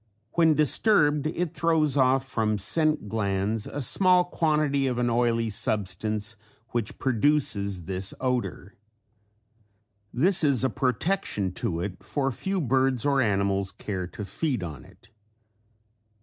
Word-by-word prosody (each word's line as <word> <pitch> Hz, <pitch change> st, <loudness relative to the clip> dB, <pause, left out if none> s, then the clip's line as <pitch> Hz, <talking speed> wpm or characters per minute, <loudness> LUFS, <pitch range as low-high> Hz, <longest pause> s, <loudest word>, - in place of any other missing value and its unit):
When 165 Hz, -2 st, +3 dB
disturbed 150 Hz, -1 st, +3 dB
it 170 Hz, +1 st, -3 dB
throws 160 Hz, -4 st, +1 dB
off 130 Hz, 0 st, +2 dB
from 110 Hz, -4 st, 0 dB
scent 155 Hz, -, +1 dB
glands 105 Hz, 0 st, -1 dB
a 145 Hz, -, -5 dB
small 180 Hz, +6 st, +4 dB
quantity 150 Hz, -5 st, +1 dB
of 125 Hz, -2 st, -2 dB
an 120 Hz, -1 st, +1 dB
oily 115 Hz, -1 st, +1 dB
substance 105 Hz, +2 st, -2 dB, 0.3 s
which 115 Hz, -3 st, -3 dB
produces 115 Hz, -, 0 dB
this 95 Hz, +2 st, -3 dB
odor. 125 Hz, -6 st, -3 dB, 1.4 s
This 170 Hz, +7 st, +3 dB
is 140 Hz, -5 st, +3 dB
a 130 Hz, -, +1 dB
protection 130 Hz, -, -1 dB
to 85 Hz, -1 st, -3 dB
it 90 Hz, 0 st, -5 dB
for 135 Hz, -2 st, -1 dB
few 190 Hz, +9 st, -2 dB
birds 130 Hz, -2 st, +1 dB
or 140 Hz, -2 st, +3 dB
animals 100 Hz, -3 st, 0 dB
care 95 Hz, -2 st, -5 dB
to 100 Hz, +4 st, -8 dB
feed 120 Hz, -, -2 dB
on 80 Hz, -5 st, -7 dB
it. -, -, -21 dB
125 Hz, 130 wpm, -26 LUFS, 100-150 Hz, 1.4 s, small